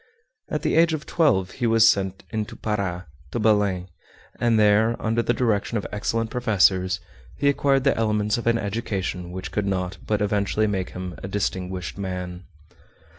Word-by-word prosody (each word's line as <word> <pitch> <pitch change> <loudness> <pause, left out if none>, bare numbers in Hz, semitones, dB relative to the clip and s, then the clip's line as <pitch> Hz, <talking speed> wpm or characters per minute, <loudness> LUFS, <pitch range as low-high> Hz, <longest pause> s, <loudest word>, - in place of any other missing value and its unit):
At 150 - -2
the - - +1
age 165 0 +5
of 150 - -7
twelve 95 - +2
he 120 -2 -1
was 115 0 +6
sent 95 -3 +1
into 110 -2 -3
Para, 95 -4 -2 0.2
to 120 - -3
Belem, 105 -4 +2 0.5
and 120 -2 +3
there, 110 +2 +4
under 115 +1 +1
the 120 - +1
direction 115 -2 0
of 105 - -3
excellent 110 +2 -1
professors, 95 -6 +2 0.4
he 140 - +1
acquired 140 -1 +3
the 140 - +3
elements 105 0 +1
of 120 - -5
an 115 0 +4
education 100 -4 -3
which 95 +1 -6
could 105 -1 -1
not 90 -1 -2
but 105 -1 +1
eventually 105 +1 +1
make 95 -3 -1
him 90 0 -5
a - - -5
distinguished 95 -2 -3
man. 90 -2 -5
105 Hz, 170 wpm, -24 LUFS, 95-115 Hz, 0.5 s, was